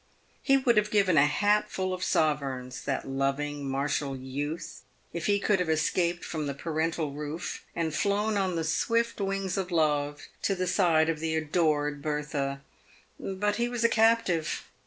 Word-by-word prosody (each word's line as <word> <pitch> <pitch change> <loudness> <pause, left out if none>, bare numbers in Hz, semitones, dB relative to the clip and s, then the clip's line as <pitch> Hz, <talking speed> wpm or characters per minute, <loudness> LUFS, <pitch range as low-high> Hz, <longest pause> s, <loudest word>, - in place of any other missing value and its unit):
He 275 -1 +4
would 245 -4 +2
have 210 0 +3
given 200 -5 +3
a 145 0 +6
hat 210 +6 +2
full 185 -1 -2
of 185 0 -4
sovereigns, 135 -5 0
that 135 - -2
loving, 140 +1 -1
martial 140 0 -1
youth, 145 +5 -5 0.3
if 170 -2 -3
he 205 - +4
could 200 -1 +2
have 180 -3 -1
escaped 170 +2 +1
from 155 -3 -3
the 140 - -3
parental 160 0 -1
roof, 150 +4 -5
and 165 -2 -1
flown 205 +5 +1
on 190 -3 0
the 165 - -1
swift 230 +8 0
wings 195 -1 -1
of 190 -2 -2
love 150 -3 +1 0.2
to 195 - +1
the 185 0 -1
side 170 -4 +3
of 165 -2 -1
the 160 0 -1
adored 150 -2 +1
Eertha. 145 -2 -2 0.6
But 205 +2 -1
he 240 0 0
was 240 -1 -2
a 230 - +5
captive. 225 -8 +2
160 Hz, 170 wpm, -28 LUFS, 145-195 Hz, 0.6 s, a